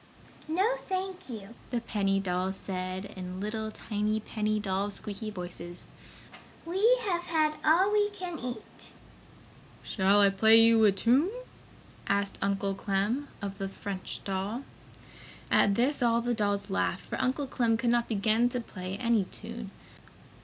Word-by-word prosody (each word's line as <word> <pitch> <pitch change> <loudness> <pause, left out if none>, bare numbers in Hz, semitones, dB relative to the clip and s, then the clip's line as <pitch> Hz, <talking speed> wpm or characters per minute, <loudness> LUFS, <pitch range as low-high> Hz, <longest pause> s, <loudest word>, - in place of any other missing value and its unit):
"No 390 +10 +2
thank 375 -3 -4
you!" 210 -5 -7 0.2
the 245 - 0
penny 200 -4 0
dolls 185 0 -1
said 185 0 -4
in 185 0 -6
little 215 +2 -3
penny 215 0 -1
doll, 200 0 -1
squeaky 210 +2 -5
voices, 175 -3 -7 0.8
"We 365 +4 -2 0.2
have 350 -4 -1
had 310 -2 +2
all 360 +7 +4
we 415 -1 +3
can 365 -5 -6
eat!" 245 0 -6 0.9
"Shall 195 0 +3
I 200 -1 +6
play 220 +3 +6
you 225 0 +6
a 205 - +7
tune?" 245 - +3 0.8
asked 200 0 0
Uncle 195 0 0
Clem 205 +8 -1 0.2
of 200 0 -4
the 195 0 -2
French 195 -1 -5
doll. 200 +6 -2 0.9
At 200 - +5
this 265 +5 +2
all 235 -1 +3
the 240 +1 0
dolls 205 -2 0
laughed, 190 -1 0
for - - -3
Uncle 260 +3 0
Clem 235 -4 +1
could 235 +1 +1
not 240 -1 +2
begin 220 +2 +2
to 250 - -1
play 185 -4 -6
any 230 -3 +2
tune. 225 +2 -7
215 Hz, 145 wpm, -29 LUFS, 195-250 Hz, 0.9 s, a